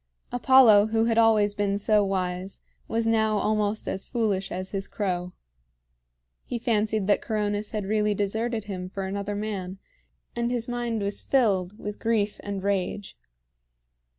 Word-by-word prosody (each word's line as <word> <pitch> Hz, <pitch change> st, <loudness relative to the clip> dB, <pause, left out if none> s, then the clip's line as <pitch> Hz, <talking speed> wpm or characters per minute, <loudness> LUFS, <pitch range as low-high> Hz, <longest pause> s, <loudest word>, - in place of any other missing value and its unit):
Apollo, 245 Hz, -4 st, +6 dB
who 225 Hz, 0 st, +1 dB
had 230 Hz, 0 st, +2 dB
always 215 Hz, -2 st, +4 dB
been 200 Hz, -1 st, 0 dB
so 210 Hz, +1 st, +3 dB
wise, 185 Hz, -1 st, -3 dB, 0.3 s
was 225 Hz, 0 st, 0 dB
now 220 Hz, -1 st, +2 dB
almost 210 Hz, 0 st, 0 dB
as 190 Hz, -, -3 dB
foolish 210 Hz, -5 st, -1 dB
as 185 Hz, +1 st, -5 dB
his 195 Hz, -1 st, -3 dB
crow. 180 Hz, -3 st, -2 dB, 1.1 s
He 245 Hz, -, -4 dB
fancied 220 Hz, -3 st, 0 dB
that 205 Hz, -, +2 dB
Coronis 210 Hz, -1 st, -2 dB
had 210 Hz, -3 st, -3 dB
really 210 Hz, 0 st, +1 dB
deserted 220 Hz, +3 st, -1 dB
him 185 Hz, -3 st, -6 dB
for 195 Hz, 0 st, -4 dB
another 200 Hz, +1 st, -3 dB
man, 200 Hz, -3 st, -4 dB, 0.6 s
and 235 Hz, 0 st, 0 dB
his 240 Hz, -2 st, -2 dB
mind 240 Hz, -3 st, -2 dB
was 200 Hz, 0 st, -1 dB
filled 205 Hz, -7 st, +1 dB
with 210 Hz, -1 st, -6 dB
grief 215 Hz, -2 st, 0 dB
and 200 Hz, -2 st, -5 dB
rage. 200 Hz, 0 st, -2 dB
210 Hz, 150 wpm, -26 LUFS, 195-225 Hz, 1.1 s, Apollo